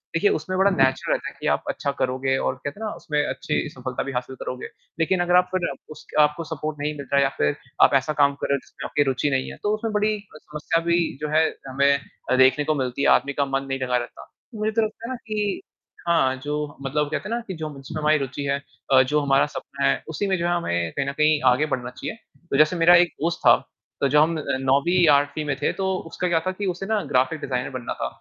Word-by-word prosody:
देखिए 410 - +3
उसमें 185 -1 -4
बड़ा 195 +1 +5
नेचुरल 135 -5 +2
रहता - - -4
है - - -16
कि - - -3
आप - - -8
अच्छा 140 - -1
करोगे 130 +1 0
और - - -1
कहते 145 +8 -5
ना 215 - -1
उसमें 150 -2 -2
अच्छी - - -2
सफलता 130 -3 -4
भी 140 - -5
हासिल 130 +1 -4
करोगे। 125 0 -6 0.3
लेकिन 175 +3 +2
अगर 175 0 +2
आप 180 0 +4
फिर 180 -2 +1 0.3
उसक - - -14
आपको 150 +3 +2
सपोर्ट 155 0 -4
नहीं 150 +1 -1
मिल 140 - -7
रहा 140 - +3
है 140 - +5
या 135 - +2
फिर 75 - +1 0.3
आप - - +6
ऐसा 155 - -3
काम 140 0 +4
कर - - -1
रहे 140 - +3
हो - - -2
जिसमें - - -10
आपकी 145 - +2
रुचि 135 +3 0
नहीं 130 -1 -1
है - - -10
तो 210 - +1
उसमें 220 0 -4
बड़ी 210 +1 +2
अ, 200 -6 -15
समस्या 150 +2 -2
भी 170 0 +3 0.2
जो 150 - -2
है 160 +1 +5 0.2
हमें 140 +1 +3 0.3
अ, - - +5
देखने 130 +3 +5
को 155 - +1
मिलती 125 +1 -2
है, - - +3
आदमी 140 +2 +3
का 140 0 +1
मन 135 0 -2
नहीं 135 0 -2
लगा 125 -1 +1
रहता। 120 - -7 0.3
मुझे 215 0 -1
तो 225 +1 +1
लगता 220 +1 -7
है - - -5
ना - - -3
कि 210 -2 -1 0.5
हाँ 135 -6 +3
जो 145 0 -3 0.3
मतलब 145 +2 -1
कहते 155 - -3
ना 235 +1 -1
कि 190 - -4
जो 155 -1 -4
जिसमें 145 +4 -7
हमारी 155 +1 +4
रुचि 140 0 -4
है, 140 0 0 0.3
अ, 130 - +8
जो 150 +3 +1
हमारा 140 -1 +3
सपना 140 +1 -4
है - - +1
उसी 180 +6 -2
में 190 -1 +1
जो 170 - -2
है 175 - +1
हमें 85 - -1
कहीं 140 - -1
न - - 0
कहीं 150 +1 +3
आगे 135 +5 +2
बढ़ना 125 -1 -2
चाहिए। 125 +11 -6 0.3
तो 135 - +1
जैसे 155 +4 +4
मेरा 170 +1 +6
एक 175 - -3
दोस्त 170 +2 0
था - - +9 0.5
तो 140 - +4
जब 150 +2 +5
हम 160 +2 +3 0.3
9वीं 160 +7 +3
8वीं 145 +1 +3
में 145 -2 -1
थे, - - +2
तो 195 - -3 0.2
उसका 180 - -2
क्या 170 -2 +2
था - - +2
कि 200 +2 -5
उसे 180 +2 -6
ना 215 +1 +1
ग्राफ़िक 130 +5 +2
डिज़ाइनर 125 -1 -2
बनना 130 -2 -4
था - - 0
150 Hz, 255 wpm, -24 LUFS, 135-175 Hz, 0.5 s, था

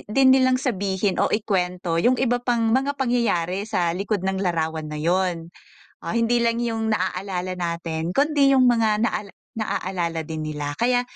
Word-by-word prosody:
din 260 +4 +5
nilang 260 -1 +4
sabihin 200 -6 -1
o - - +3
ikuwento 180 -5 -1
yung 250 +8 +3
iba 245 -1 +1
pang 235 -2 +1
mga 270 +3 +1
pangyayari 215 -7 0
sa 175 -5 0
likod 195 +1 -2
ng 190 0 -1
larawan 160 -4 -2
na 150 - -6
'yon. 170 +1 -1 0.5
Ah, - - -3
hindi 230 +1 +2
lang 235 0 +1
yung 225 -2 -2
naaalala 185 -2 -3
natin, 170 -1 -3
kundi 280 0 +3
yung 255 -2 +5
mga 220 -3 +2
naal 200 -3 -5 0.2
naaalala 180 -6 -2
din 155 0 -5
nila. 145 -1 -4
Kaya 245 +1 +2
195 Hz, 160 wpm, -23 LUFS, 175-240 Hz, 0.5 s, din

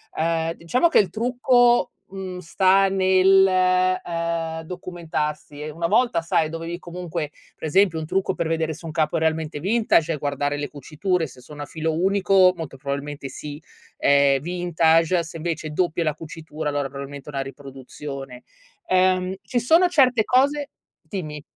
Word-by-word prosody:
Uhm, 165 0 0
diciamo 205 - +1
che - - +5
il 195 - +2
trucco, 245 +3 +3 0.2
mhmm, 190 -1 -7
sta 190 +3 +3
nel, 190 0 +5 0.6
uhm, 165 -1 -3
documentarsi 160 -4 -5
e 150 - -5
una 165 +2 -2
volta, 230 -1 +2
sai, 165 -1 +1
dovevi 165 +1 -5
comunque 170 -4 -5 0.2
per - - -5
esempio 190 0 +3
un 155 - -4
trucco 190 +4 0
per 165 - -2
vedere 160 -1 -1
se 165 - -12
un 160 - -5
capo 155 0 0
è - - +2
realmente 160 -1 -1
vintage 195 -4 +2
è 150 - -3
guardare 145 0 -2
le 145 0 -3
cuciture, 160 +4 -2
se 130 - -15
sono 145 +3 -11
a - - -4
filo 160 +1 -3
unico, 190 +1 +4
molto 160 -5 -6
probabilmente 140 +1 -5
sì, 145 +3 -8 0.3
è 140 -1 +4
vintage, 170 0 +2
se 165 +1 -9
invece 165 -1 -3
doppia 170 +1 0
è - - -4
la 155 - +1
cucitura 155 0 -7
allora 145 -1 -1
probabilmente 140 +1 -8
è - - -9
una 135 -1 -1
riproduzione. 135 -1 -9 0.5
Uhm, 185 0 +2
ci 245 - -1
sono 330 +9 +5
certe 255 -9 +3
cose 280 +3 +2 0.3
dimmi. 155 -7 -6
165 Hz, 165 wpm, -23 LUFS, 150-185 Hz, 0.6 s, che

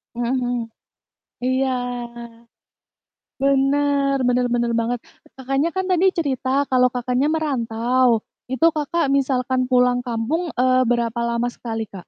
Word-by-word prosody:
Mhm 240 0 -2
mhm. 245 0 -1 1.0
Iya, 260 +1 +1 1.7
bener 275 0 +2
bener 250 0 +2
bener 235 -1 0
banget, 240 +1 -1 0.4
Kakaknya 270 +4 0
kan 375 - 0
tadi 365 +1 +3
cerita, 265 -4 -1 0.2
kalau 250 -1 +4
Kakaknya 250 +3 0
merantau. 255 -4 +1 0.4
Itu, 320 +5 +3
Kakak, 305 +1 0
misalkan 260 -1 0
pulang 250 0 +3
kampung, 240 +9 -1 0.2
eee, 255 0 +3
berapa 235 -1 0
lama 235 +1 0
sekali 225 -2 -4
Kak? - - -25
255 Hz, 120 wpm, -21 LUFS, 245-275 Hz, 1.7 s, kalau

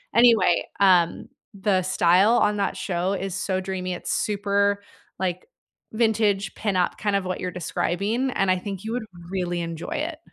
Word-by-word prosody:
Anyway, 225 -8 +5
um, 180 -4 +3 0.2
the 195 -1 +1
style 185 +5 +4
on 210 0 +2
that 200 - -1
show 185 0 -1
is 195 -1 -3
so 190 -1 -1
dreamy, 185 -1 -3
it's 175 - -5
super, 200 0 +1 0.4
like, 185 - -2 0.4
vintage 215 -3 +1
pin-up, 190 -5 0
kind 205 -2 0
of 195 -1 0
what 185 0 -3
you're 180 - -3
describing, 200 +8 -1
and 195 -4 0
I 185 - +2
think 195 0 -6
you 220 - -4
would 245 -2 -3 0.3
really 175 -2 -2
enjoy 165 -1 -5
it. 310 +1 -3
195 Hz, 165 wpm, -24 LUFS, 180-210 Hz, 0.4 s, Anyway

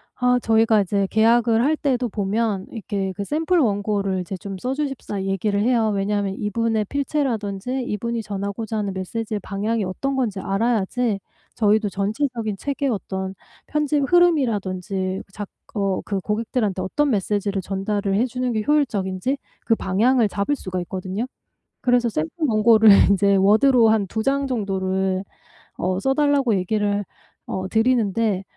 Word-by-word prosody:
아 250 0 +2
저희가 225 -1 +4
이제 195 +1 0
계약을 230 +1 +4
할 305 +4 +3
때도 255 -3 0
보면 205 0 -1
이렇게 200 -4 -3
그 200 - -3
샘플 325 - +1
원고를 200 -5 0 0.2
좀 195 0 -6
써 250 +8 -2
주십사 270 -8 -3
얘기를 195 +1 0
해요. 225 -1 +2
왜냐하면 200 0 -1
이분의 220 +1 0
필체라든지 255 -3 -2
이분이 235 +1 -3
전하고자 205 +2 -4
하는 205 -2 -2
메시지의 210 +3 -4
방향이 210 +3 -2
어떤 270 +9 -2
건지 220 -7 -1
알아야지 220 +2 0 0.4
저희도 215 -1 +2
전체적인 220 +2 -2
책의 280 +2 -2
어떤 190 -3 -3 0.3
편집 300 -1 0
흐름이라든지 200 - +1
작 205 -1 -6 0.3
어 195 -2 0
그 200 -2 -2
고객들한테 210 -2 -1
어떤 290 +10 0
메시지를 205 -2 0
전달을 195 +1 -2
해 230 - +3
주는 250 0 -2
게 215 -1 -1
효율적인지 245 -5 0 0.3
그 230 - +3
방향을 225 +4 +2
잡을 200 +9 -1
수가 185 -8 -5
있거든요. 185 +4 -4 0.6
그래서 245 -1 +2
샘플 160 -6 -2 0.2
원고를 220 -1 +6 0.2
인제 200 0 +4
워드로 225 +5 +5
한 215 -3 +2
2 220 - -2
장 275 0 +1
정도를 190 -4 -1 0.6
어 185 +1 -1
써달라고 270 0 +2
얘기를 205 +2 0 0.4
어 190 0 -3
드리는데 220 -4 +1
215 Hz, 330 characters per minute, -22 LUFS, 195-245 Hz, 0.6 s, 원고를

